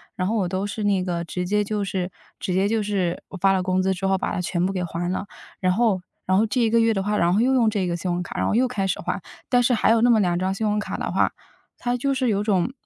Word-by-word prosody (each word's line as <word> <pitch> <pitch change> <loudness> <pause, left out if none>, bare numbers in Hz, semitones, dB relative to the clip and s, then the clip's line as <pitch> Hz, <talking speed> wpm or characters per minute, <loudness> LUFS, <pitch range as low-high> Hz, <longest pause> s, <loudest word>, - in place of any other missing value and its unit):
然 185 0 -1
后 225 - 0
我 190 - +1
都 190 +2 -2
是 210 +1 -4
那 195 -3 +2
个， 175 -2 -2
直 180 +2 -3
接 210 +3 +1
就 205 0 -2
是 185 -2 -2 0.3
直 180 - -2
接 190 +2 +2
就 225 0 +1
是， 190 -4 -1
我 190 - -7
发 195 +2 +3
了 190 -1 +2
工 185 0 +1
资 190 0 +2
之 195 +1 -2
后 190 0 +2
把 - - -2
它 - - -1
全 175 0 -1
部 190 - 0
给 185 - -2
还 175 +1 -3
了。 190 - -2 0.3
然 185 -1 +2
后 210 -3 +2 0.2
然 185 - +2
后 220 - +4
这 235 +4 0
一 225 - +3
个 230 +1 +3
月 225 -1 +3
的 195 -1 -1
话， 210 +1 0
然 170 -1 +3
后 210 - +3
又 260 +2 +3
用 235 -4 +4
这 205 -3 -1
个 170 - -1
信 180 +1 -3
用 175 +1 -1
卡， - - -9
然 - - +1
后 - - +1
又 255 +2 +3
开 200 -6 -2
始 180 - -1
还。 - - -3 0.3
但 245 -1 +4
是 245 +1 +3
还 225 - +3
有 225 0 +4
那 245 - +5
么 225 - +5
2 175 -2 +1
张 190 +1 0
信 215 +3 -2
用 210 0 +1
卡 - - -4
的 - - -3
话， - - +2 0.4
它 245 0 -1
就 275 +3 0
是 260 -2 0
有 205 -2 +1
种 200 +1 +1
195 Hz, 330 characters per minute, -23 LUFS, 185-220 Hz, 0.4 s, 那